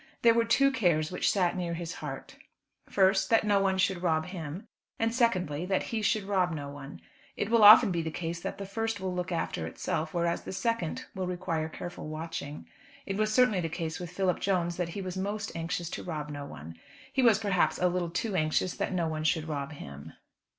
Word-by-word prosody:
There 230 Hz, -1 st, +7 dB
were 230 Hz, 0 st, +3 dB
two 275 Hz, +4 st, +4 dB
cares 175 Hz, -, +1 dB
which 180 Hz, -, +1 dB
sat 180 Hz, -4 st, +1 dB
near 175 Hz, -2 st, -2 dB
his 170 Hz, 0 st, -5 dB
heart: -, -, -7 dB, 0.5 s
first, 190 Hz, 0 st, +3 dB
that 225 Hz, -, +4 dB
no 205 Hz, -2 st, +3 dB
one 195 Hz, -1 st, +1 dB
should 185 Hz, -1 st, +1 dB
rob 160 Hz, -3 st, +1 dB
him; 180 Hz, +3 st, -7 dB, 0.3 s
and 225 Hz, 0 st, 0 dB
secondly, 185 Hz, -, +1 dB
that 190 Hz, 0 st, +1 dB
he 220 Hz, -, 0 dB
should 210 Hz, 0 st, +1 dB
rob 190 Hz, -3 st, +1 dB
no 145 Hz, -3 st, -5 dB
one. 140 Hz, 0 st, -9 dB, 0.4 s
It 205 Hz, -, -2 dB
will 230 Hz, -2 st, +5 dB
often 210 Hz, 0 st, +10 dB
be 170 Hz, -1 st, 0 dB
the 160 Hz, -, -3 dB
case 165 Hz, +1 st, -4 dB
that -, -, -5 dB
the 200 Hz, -, -5 dB
first 225 Hz, +2 st, -2 dB
will 185 Hz, -1 st, -3 dB
look 180 Hz, -1 st, -3 dB
after 85 Hz, -, -2 dB
itself, 160 Hz, -, -3 dB
whereas 170 Hz, -2 st, 0 dB
the -, -, -7 dB
second 230 Hz, -6 st, -1 dB
will 185 Hz, -1 st, -3 dB
require 165 Hz, -3 st, -2 dB
careful 175 Hz, 0 st, -7 dB
watching. 155 Hz, -2 st, -6 dB, 0.4 s
It 195 Hz, -, -3 dB
was 215 Hz, 0 st, +1 dB
certainly 215 Hz, -5 st, +4 dB
the 165 Hz, -, -2 dB
case 165 Hz, 0 st, -4 dB
with 175 Hz, -1 st, -6 dB
Philip 180 Hz, 0 st, 0 dB
Jones 175 Hz, -3 st, 0 dB
that 175 Hz, -2 st, -1 dB
he 195 Hz, +3 st, -5 dB
was 185 Hz, 0 st, -5 dB
most 205 Hz, +2 st, -3 dB
anxious 165 Hz, +1 st, -3 dB
to -, -, -5 dB
rob 150 Hz, -4 st, -4 dB
no 145 Hz, -1 st, -6 dB
one. 80 Hz, -, -10 dB, 0.3 s
He 265 Hz, -, +2 dB
was, 230 Hz, -5 st, +6 dB
perhaps, 200 Hz, -4 st, +1 dB
a 180 Hz, -, +2 dB
little 175 Hz, -1 st, -1 dB
too 195 Hz, +4 st, -2 dB
anxious 155 Hz, +2 st, +1 dB
that -, -, -2 dB
no 170 Hz, -3 st, 0 dB
one 155 Hz, -1 st, -3 dB
should 160 Hz, 0 st, +1 dB
rob 140 Hz, -2 st, -3 dB
him. 70 Hz, -, -10 dB
180 Hz, 215 wpm, -29 LUFS, 160-200 Hz, 0.5 s, often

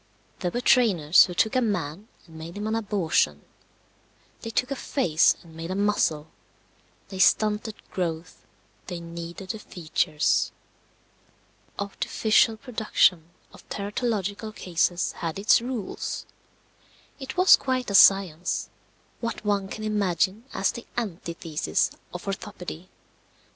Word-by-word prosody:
There 180 Hz, -, -1 dB
were 240 Hz, +7 st, -3 dB
trainers 185 Hz, -, +5 dB
who 180 Hz, -, -7 dB
took 220 Hz, +6 st, +2 dB
a 255 Hz, -, +3 dB
man 190 Hz, -3 st, -2 dB, 0.2 s
and 165 Hz, -2 st, -16 dB
made 165 Hz, +3 st, -8 dB
him 205 Hz, -, -4 dB
an 220 Hz, -, -1 dB
abortion; 190 Hz, -, 0 dB, 1.0 s
they 225 Hz, -, -5 dB
took 250 Hz, +3 st, -1 dB
a -, -, 0 dB
face 180 Hz, -, +2 dB
and 165 Hz, -2 st, -16 dB
made 165 Hz, +1 st, -6 dB
a 185 Hz, -, -2 dB
muzzle; 200 Hz, -7 st, +1 dB, 0.8 s
they 190 Hz, -, -7 dB
stunted 215 Hz, +2 st, +3 dB, 0.2 s
growth; 165 Hz, -2 st, -4 dB, 0.4 s
they 175 Hz, -, -5 dB
kneaded 170 Hz, +2 st, -7 dB
the 220 Hz, -, -7 dB
features. 155 Hz, -5 st, 0 dB, 1.3 s
The -, -, -1 dB
artificial 220 Hz, +2 st, +2 dB
production 215 Hz, -8 st, +1 dB, 0.2 s
of -, -, -15 dB
teratological 210 Hz, 0 st, -3 dB
cases 175 Hz, 0 st, 0 dB
had 165 Hz, -1 st, -5 dB
its 205 Hz, +3 st, +4 dB
rules. 240 Hz, -5 st, -4 dB, 0.9 s
It 265 Hz, +2 st, -7 dB
was 365 Hz, +1 st, +8 dB
quite 255 Hz, -4 st, -2 dB
a -, -, -3 dB
science 190 Hz, -4 st, +4 dB, 0.5 s
what 230 Hz, -2 st, -4 dB
one 200 Hz, -2 st, +1 dB
can 215 Hz, +2 st, -7 dB
imagine 205 Hz, 0 st, 0 dB
as -, -, +1 dB
the 235 Hz, -, -9 dB
antithesis 170 Hz, -7 st, -2 dB, 0.2 s
of 180 Hz, -, -8 dB
orthopedy. 185 Hz, -3 st, -6 dB
195 Hz, 125 wpm, -26 LUFS, 170-220 Hz, 1.3 s, was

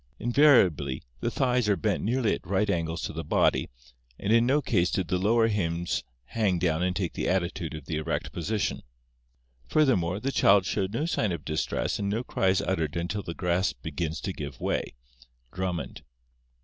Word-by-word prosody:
Invariably 105 Hz, -, +3 dB, 0.2 s
the -, -, -1 dB
thighs 125 Hz, -4 st, +1 dB
are 100 Hz, -, +4 dB
bent 105 Hz, -1 st, -1 dB
nearly 120 Hz, 0 st, +1 dB
at -, -, -6 dB
right 100 Hz, +2 st, +1 dB
angles 85 Hz, -2 st, -2 dB
to -, -, -4 dB
the -, -, -4 dB
body, -, -, +2 dB, 0.5 s
and 105 Hz, +2 st, 0 dB
in 115 Hz, +1 st, +4 dB
no 140 Hz, +3 st, +4 dB
case 95 Hz, -10 st, +1 dB
did 90 Hz, -4 st, -2 dB
the 90 Hz, -, +1 dB
lower 115 Hz, +4 st, +3 dB
limbs 85 Hz, -5 st, -1 dB, 0.2 s
hang 100 Hz, -, 0 dB
down 85 Hz, -2 st, 0 dB
and 90 Hz, 0 st, 0 dB
take 90 Hz, -3 st, -2 dB
the -, -, -2 dB
attitude 85 Hz, -3 st, -1 dB
of 75 Hz, -3 st, -9 dB
the 80 Hz, +1 st, -3 dB
erect 80 Hz, +1 st, -2 dB
position. 100 Hz, +4 st, -2 dB, 0.9 s
Furthermore, 100 Hz, -, +2 dB
the 135 Hz, +4 st, -2 dB
child 100 Hz, -6 st, +4 dB
shows 95 Hz, 0 st, -1 dB
no 140 Hz, +8 st, -1 dB
sign 110 Hz, -, 0 dB
of 85 Hz, -4 st, -5 dB
distress 80 Hz, 0 st, -1 dB
and 100 Hz, -1 st, -1 dB
no 110 Hz, +4 st, -1 dB
cry 95 Hz, -, -1 dB
is 95 Hz, 0 st, +3 dB
uttered 80 Hz, -6 st, -1 dB
until 90 Hz, +5 st, -2 dB
the 85 Hz, -3 st, -6 dB
grasp 90 Hz, 0 st, 0 dB
begins 80 Hz, +1 st, -3 dB
to 95 Hz, -, -3 dB
give 70 Hz, -5 st, -7 dB
way" -, -, -2 dB, 0.6 s
(Drummond). 90 Hz, -2 st, -3 dB
95 Hz, 185 wpm, -27 LUFS, 85-110 Hz, 0.9 s, are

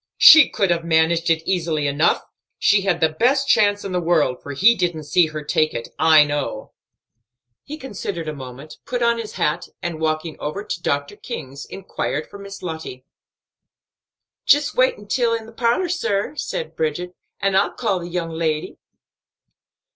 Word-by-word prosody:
"She 315 Hz, -3 st, +9 dB
could 195 Hz, -3 st, 0 dB
have 170 Hz, -1 st, 0 dB
managed 165 Hz, +1 st, +2 dB
it 165 Hz, 0 st, +2 dB
easily 165 Hz, -5 st, 0 dB
enough; 145 Hz, +3 st, +2 dB, 0.3 s
she 205 Hz, -1 st, +3 dB
had 190 Hz, -3 st, 0 dB
the 160 Hz, -, +4 dB
best 260 Hz, -, +1 dB
chance 205 Hz, -4 st, +3 dB
in 195 Hz, -, -4 dB
the 180 Hz, -1 st, -1 dB
world, 160 Hz, -7 st, +1 dB
for 145 Hz, -, -7 dB
he 205 Hz, -, +5 dB
didn't 175 Hz, -7 st, -2 dB
see 160 Hz, +3 st, +3 dB
her 155 Hz, -1 st, -6 dB
take 155 Hz, +1 st, 0 dB
it, 115 Hz, -, -5 dB
I 155 Hz, -1 st, +7 dB
know." 145 Hz, -1 st, -4 dB, 0.9 s
He 300 Hz, -, -7 dB
considered 200 Hz, -, -6 dB
a 155 Hz, -, -3 dB
moment, 135 Hz, +2 st, -10 dB
put 245 Hz, -1 st, -2 dB
on 235 Hz, 0 st, +2 dB
his 220 Hz, -2 st, -6 dB
hat, 150 Hz, +2 st, -1 dB
and, 165 Hz, -2 st, -5 dB
walking 155 Hz, 0 st, -2 dB
over 155 Hz, +8 st, -4 dB
to 170 Hz, -, -5 dB
Dr. 145 Hz, +4 st, -2 dB
King's, 140 Hz, -, -8 dB
inquired 155 Hz, -5 st, -4 dB
for 200 Hz, -, -10 dB
Miss 200 Hz, -1 st, -10 dB
Lottie. 160 Hz, -7 st, -7 dB, 1.4 s
"Jist 290 Hz, 0 st, +3 dB
walk 255 Hz, +1 st, +3 dB
intil 230 Hz, +3 st, 0 dB
the 225 Hz, -, -13 dB
parlor, 235 Hz, +10 st, 0 dB
sir," 300 Hz, -, -1 dB
said -, -, -4 dB
Bridget, 175 Hz, +3 st, -2 dB, 0.3 s
"an' 195 Hz, -1 st, 0 dB
I'll 195 Hz, -, +2 dB
call 205 Hz, -6 st, -1 dB
the 170 Hz, -, -7 dB
young 170 Hz, -1 st, -3 dB
lady." 160 Hz, -1 st, -2 dB
175 Hz, 170 wpm, -21 LUFS, 155-205 Hz, 1.4 s, She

